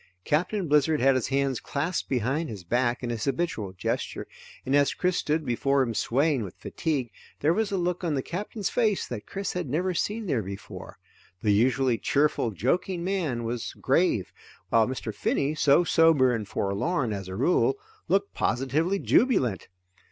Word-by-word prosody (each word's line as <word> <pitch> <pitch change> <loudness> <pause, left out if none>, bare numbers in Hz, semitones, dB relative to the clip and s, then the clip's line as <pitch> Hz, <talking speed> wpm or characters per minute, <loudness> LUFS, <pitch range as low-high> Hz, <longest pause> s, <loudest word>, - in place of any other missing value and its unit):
Captain 180 +5 0
Blizzard 150 +1 +3
had 135 +2 +4
his 130 -3 0
hands 135 -2 0
clasped 150 +6 -3
behind 135 +6 0
his 100 -5 -7
back 120 +6 0
in 120 - -2
his 115 -2 -3
habitual 140 - -2
gesture, 95 - -3 0.4
and 135 - +1
as 145 -1 +3
Chris 180 0 0
stood 155 +1 0
before 135 +2 +2
him 115 -3 -2
swaying 140 +5 +1
with 95 - -8
fatigue, 140 -8 -3 0.3
there 155 +3 +3
was 215 +2 0
a 195 - 0
look 180 0 -1
on 160 -4 0
the 135 - -1
Captain's 205 +3 -4
face 220 -5 +1
that 110 -4 -7
Chris 195 0 -4
had 180 -7 -3
never 180 +7 0
seen 210 +5 -2
there 135 - 0
before. 100 0 -8 0.5
The 105 - +3
usually 125 +2 +2
cheerful, 145 -4 +1
joking 170 - -1
man 170 -11 -1
was 115 +1 -4
grave, - - +1 0.4
while 115 -1 +4
Mr. 130 -4 -4
Finney, 140 +7 0
so 150 +2 +4
sober 160 -7 +4
and 110 -3 -3
forlorn 110 - -1
as 95 -2 -5
a 95 - -6
rule, 180 - +2 0.3
looked 200 +1 +1
positively 140 - 0
jubilant. 190 - +2
140 Hz, 170 wpm, -27 LUFS, 120-175 Hz, 0.5 s, had